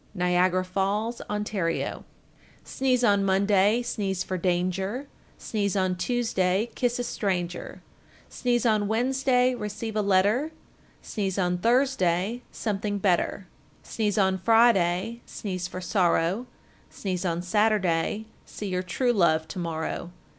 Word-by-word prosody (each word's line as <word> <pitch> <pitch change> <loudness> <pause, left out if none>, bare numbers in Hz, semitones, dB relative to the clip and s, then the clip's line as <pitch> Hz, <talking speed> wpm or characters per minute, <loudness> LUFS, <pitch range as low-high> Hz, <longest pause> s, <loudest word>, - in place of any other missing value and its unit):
Niagara 180 0 +2
Falls, 200 +5 -1
Ont. 210 0 -2
1429. 165 -5 -2 0.6
Sneeze 255 -2 0
on 200 -3 +4
Monday, 200 +3 +3
sneeze 195 -5 -2
for 185 - -4
danger, 185 +7 -1 0.3
Sneeze 205 -2 -2
on 185 -1 +1
Tuesday, 210 -1 0
kiss 245 -1 0
a 245 - -2
stranger, 180 -6 -3 0.4
Sneeze 245 -1 0
on 215 -3 +2
Wednesday, 250 +2 +2
receive 215 -1 -5
a 215 - +2
letter, 205 +9 +2 0.5
Sneeze 195 -3 -3
on 180 -2 0
Thursday, 230 -3 +1
something 205 -1 -2
better, 190 0 0 0.4
Sneeze 215 -2 -1
on 190 -2 +2
Friday, 225 0 +3
sneeze 185 -3 -4
for 185 - -7
sorrow, 180 +4 +1 0.4
Sneeze 185 -2 -4
on 175 -1 -1
Saturday, 205 -1 +1 0.2
see 205 - -7
your 180 0 -1
true 240 +7 0
love 160 -6 +2
to 190 - -5
morrow. 165 0 -3
200 Hz, 125 wpm, -26 LUFS, 180-225 Hz, 0.6 s, on